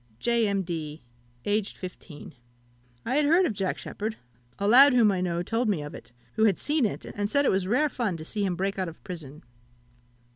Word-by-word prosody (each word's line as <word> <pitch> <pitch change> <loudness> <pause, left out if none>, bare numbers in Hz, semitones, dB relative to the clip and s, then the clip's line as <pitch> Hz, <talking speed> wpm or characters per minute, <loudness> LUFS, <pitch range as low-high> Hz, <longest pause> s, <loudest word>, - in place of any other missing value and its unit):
"J. 235 - +1
M'D. 165 -6 -3 0.4
(aged 205 0 -1
15). 180 -4 -9 0.7
I 255 +4 0
have 300 - +3
heard 345 +5 +5
of 235 - -1
Jack 195 -2 -2
Sheppard: 220 +1 -5 0.4
a 200 - -1
lad 265 +5 +8
whom 225 -4 +5
I 185 -2 -1
know 175 -1 -1
told 225 +4 0
me 175 -8 0
of 145 - -8
it, - - -11 0.2
who 220 0 +3
had 200 -5 +3
seen 295 -3 +1
it, 205 - -3
and 205 0 -3
said 285 +4 +2
it - - +4
was 190 -1 0
rare 270 +9 +2
fun 235 - -2
to 155 - -8
see 205 +4 -3
him 185 -3 0
break 195 +2 -2
out 185 -2 -1
of 165 - -15
prison. 160 -6 -8
200 Hz, 210 wpm, -27 LUFS, 180-235 Hz, 0.7 s, lad